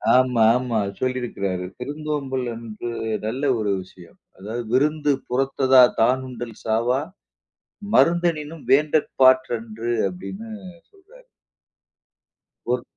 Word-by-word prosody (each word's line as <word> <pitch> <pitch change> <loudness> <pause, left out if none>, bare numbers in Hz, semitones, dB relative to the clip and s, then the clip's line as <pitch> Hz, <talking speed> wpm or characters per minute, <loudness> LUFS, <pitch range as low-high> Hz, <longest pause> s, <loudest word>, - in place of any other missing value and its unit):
ஆமா, 125 -2 +3 0.2
ஆமா. 125 -3 -2 0.2
சொல்லிருக்கிறாரு. 110 -8 -2
விருந்தோம்பல் 140 -1 -3
வந்து 115 0 -7 0.4
நல்ல 120 +5 -3 0.2
ஒரு 105 -2 0
விஷயம். 90 -1 -16 0.2
அதாவது 110 +6 -5
"விருந்து 150 +3 +2 0.2
புறத்ததா 130 0 +4 0.2
தானுண்டல் 125 -1 0
சாவா 115 +4 +1 1.0
மருந்தெனினும் 165 -3 +1
வேண்டற் 150 +2 +3
பாற் 130 0 +6
றன்று." 115 0 -4 0.2
அப்பிடின்னு 195 +5 -8 0.4
சொல்றாரு. 420 +5 -20 1.5
ஒரு - - 0
130 Hz, 95 wpm, -23 LUFS, 115-150 Hz, 1.5 s, பாற்